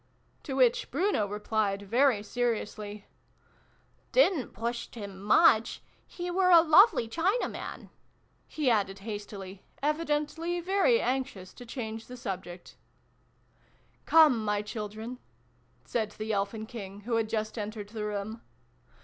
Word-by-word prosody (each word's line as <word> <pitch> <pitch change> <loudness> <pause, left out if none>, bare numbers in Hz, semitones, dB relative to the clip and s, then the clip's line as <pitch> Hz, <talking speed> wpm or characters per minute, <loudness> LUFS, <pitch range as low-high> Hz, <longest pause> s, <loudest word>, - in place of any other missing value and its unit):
" - - -38
To 270 - -4
which 250 -3 +3
Bruno 290 - +1
replied, 205 -1 -1
very 235 +1 +2
seriously, 215 -3 -3 0.5
" - - -37
Didn't 360 - +3
pushed 235 +3 -4
him 200 -4 -8
muck 220 +2 +5 0.4
he 355 0 -5
were 365 +1 +3
a 340 -2 +9
lovely 335 - +6
china 360 - 0
man," - - -8 0.6
he 300 -3 -3
added 200 -3 +1
hastily, 205 -3 -7 0.2
evidently 305 +3 -1
very 395 +7 +3
anxious 255 -8 -3
to 245 - -12
change 225 -2 -6
the 250 - -9
subject. 185 -5 -7 0.6
" - - -36
Come, 300 -9 +6
my 210 -1 0
children! 215 +3 -6 0.3
" - - -39 0.3
said 220 -3 -1
the 215 0 -3
Elfin 205 +2 -2
King, 205 -4 -8
who 230 +2 -1
had 225 -1 0
just 215 -1 -2
entered 210 -1 -5
the 215 -1 -5
room. 210 +2 -4
225 Hz, 135 wpm, -29 LUFS, 210-290 Hz, 0.6 s, a